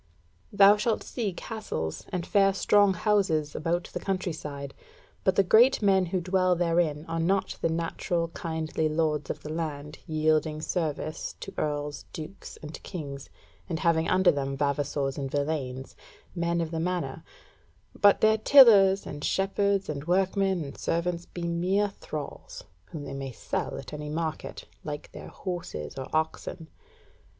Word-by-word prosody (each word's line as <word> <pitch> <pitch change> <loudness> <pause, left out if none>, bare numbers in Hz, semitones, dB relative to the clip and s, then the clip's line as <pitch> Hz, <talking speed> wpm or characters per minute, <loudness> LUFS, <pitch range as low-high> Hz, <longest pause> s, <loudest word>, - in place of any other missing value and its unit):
Thou 200 +1 +7
shalt 220 +1 0
see 225 -6 -3
castles 175 - -5
and 180 -2 -3
fair 195 -1 +3
strong 205 -1 +4
houses 175 -7 +1
about 170 +2 0
the - - -2
country 185 -3 -2
side, 140 -3 -7 0.5
but 190 - +3
the 195 - +5
great 230 +8 +6
men 190 -2 +4
who 185 +2 -1
dwell 185 0 +2
therein 165 -3 +1
are 165 0 -2
not 190 +4 0
the - - +2
natural 165 +1 -1
kindly 160 -2 -2
lords 155 -2 0
of - - -5
the 150 - -5
land 150 -2 -4
yielding 155 -1 +1
service 155 -2 -3
to - - -7
Earls, 145 -1 -3
Dukes, 160 +5 -8
and 150 +1 -8
Kings, 140 -7 -7 0.4
and 165 - -1
having 165 -1 +2
under 185 0 +5
them 135 -1 -3
vavassors 140 -1 -1
and 135 -1 -3
villeins, 140 -3 -3 0.4
men 170 -1 0
of 165 -1 -3
the 165 - -2
manor; 180 +1 -2 0.7
but 205 -1 +4
their 220 0 +4
tillers 205 -7 +7
and 145 0 -7
shepherds 195 0 +1
and 145 0 -5
workmen 190 0 +1
and 140 -1 -8
servants 170 0 -1
be 175 - -7
mere 180 +5 +1
thralls, 155 -6 -7 0.2
whom 150 - -8
they 135 -1 -6
may 135 -1 -5
sell - - -3
at - - -9
any 150 0 -5
market, 160 0 -4 0.2
like 145 -1 -6
their - - -9
horses 170 - -6
or 130 -1 -5
oxen. 160 +1 -2
165 Hz, 155 wpm, -28 LUFS, 150-190 Hz, 0.7 s, Thou